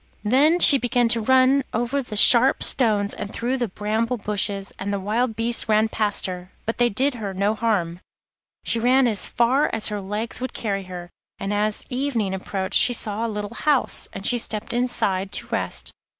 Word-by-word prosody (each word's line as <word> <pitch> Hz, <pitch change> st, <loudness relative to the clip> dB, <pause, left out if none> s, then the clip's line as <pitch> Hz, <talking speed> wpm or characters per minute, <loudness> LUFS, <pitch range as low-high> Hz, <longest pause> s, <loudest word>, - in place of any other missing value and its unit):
Then 275 Hz, +10 st, +3 dB
she 285 Hz, -5 st, +7 dB
began 245 Hz, 0 st, +1 dB
to 230 Hz, 0 st, +1 dB
run 260 Hz, +3 st, +3 dB
over 240 Hz, +5 st, -1 dB
the 240 Hz, -4 st, -8 dB
sharp 240 Hz, +5 st, +6 dB
stones, 210 Hz, -6 st, +2 dB
and 200 Hz, -, -7 dB
through 245 Hz, +4 st, -2 dB
the 240 Hz, -2 st, -2 dB
bramble 220 Hz, +5 st, -2 dB
bushes, 200 Hz, -2 st, -2 dB
and 200 Hz, +1 st, -4 dB
the 200 Hz, -, -2 dB
wild 220 Hz, +4 st, -1 dB
beasts 230 Hz, +1 st, -1 dB
ran 215 Hz, +1 st, +3 dB
past 210 Hz, -2 st, -1 dB
her, 180 Hz, 0 st, -6 dB
but 225 Hz, -, -4 dB
they 240 Hz, 0 st, +3 dB
did 265 Hz, +7 st, 0 dB
her 205 Hz, -5 st, -6 dB
no 200 Hz, +3 st, 0 dB
harm. 200 Hz, -7 st, -1 dB, 0.6 s
She 230 Hz, -, -1 dB
ran 255 Hz, +3 st, +3 dB
as 215 Hz, -4 st, +1 dB
far 250 Hz, +5 st, +1 dB
as 225 Hz, 0 st, +1 dB
her 210 Hz, -1 st, -4 dB
legs 210 Hz, +5 st, -4 dB
would 255 Hz, -, -4 dB
carry 195 Hz, -3 st, -3 dB
her, 180 Hz, -1 st, -9 dB, 0.3 s
and 195 Hz, +1 st, -4 dB
as 210 Hz, 0 st, -1 dB
evening 250 Hz, -7 st, -2 dB
approached 190 Hz, 0 st, -1 dB
she 245 Hz, -, +4 dB
saw 225 Hz, 0 st, -2 dB
a -, -, -4 dB
little 210 Hz, +1 st, -5 dB
house, 290 Hz, +1 st, 0 dB
and 195 Hz, -, -7 dB
she 245 Hz, -, +1 dB
stepped 215 Hz, -1 st, -3 dB
inside 200 Hz, -6 st, -1 dB
to -, -, -1 dB
rest. -, -, -3 dB
220 Hz, 195 wpm, -22 LUFS, 200-245 Hz, 0.6 s, she